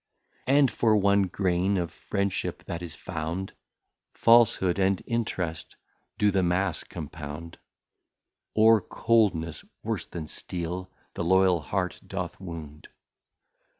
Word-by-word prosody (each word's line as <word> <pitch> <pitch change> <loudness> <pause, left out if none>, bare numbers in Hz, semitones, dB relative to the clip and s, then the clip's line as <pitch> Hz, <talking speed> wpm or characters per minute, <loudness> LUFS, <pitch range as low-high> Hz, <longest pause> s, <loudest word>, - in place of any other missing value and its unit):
And 140 -1 +5
for 110 -2 +3
one 100 -1 +3
Grain 95 +1 +1
of 85 -2 -2
Friendship 100 +2 -2
that 85 - -5
is 85 -3 -7
found, 85 +2 -4 0.3
} - - -57
Falshood 115 -6 +5
and 95 0 +2
Interest 95 -8 -3 0.4
do 105 0 +3
the 95 -1 +2
Mass 90 +2 0
compound, 80 0 -8 0.5
} - - -59
Or 110 0 +6
coldness, 95 -9 +1 0.2
worse - - -2
than 80 -3 -6
Steel, 90 +3 -5 0.2
the - - -3
Loyal 95 0 +4
heart 90 +3 -2
doth - - -4
wound. 80 -5 -9
95 Hz, 120 wpm, -27 LUFS, 85-100 Hz, 0.5 s, Or